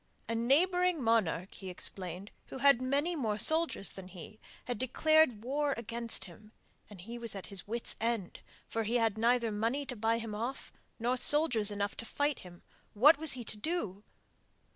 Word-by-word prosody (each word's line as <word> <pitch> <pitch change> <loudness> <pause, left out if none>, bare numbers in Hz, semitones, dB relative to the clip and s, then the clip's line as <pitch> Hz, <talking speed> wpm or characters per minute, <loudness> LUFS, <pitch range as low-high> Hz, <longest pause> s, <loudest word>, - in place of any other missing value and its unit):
A 230 - -2
neighbouring 350 +9 +2
monarch, 200 -6 +1
he 190 - -8
explained, 185 +1 -4 0.2
who - - -8
had 275 -2 +4
many 285 +7 0
more 220 -8 -1
soldiers 315 -5 +2
than 190 -1 -8
he, 185 +3 -12 0.3
had 245 -4 -4
declared 260 -3 +3
war 285 +3 0
against 235 0 -3
him, 210 +4 -15 0.4
and 200 -4 -11
he 235 +5 -8
was 230 -3 -6
at 195 - -7
his 200 -2 -4
wits' 230 +2 -4
end, 225 -5 -2 0.3
for 225 - -2
he 225 +3 -2
had 225 -3 +2
neither 235 0 +2
money 230 +7 -1
to 250 - -5
buy 225 +1 +1
him 225 -2 -5
off 235 +6 -5 0.2
nor 245 +2 0
soldiers 245 -6 +3
enough 205 -1 -3
to 230 - -7
fight 290 +4 -1
him 175 -1 -13 0.3
what 280 +8 +6
was 320 -1 +5
he 250 -1 -3
to 215 - -3
do? 210 - -3
230 Hz, 180 wpm, -32 LUFS, 210-275 Hz, 0.4 s, what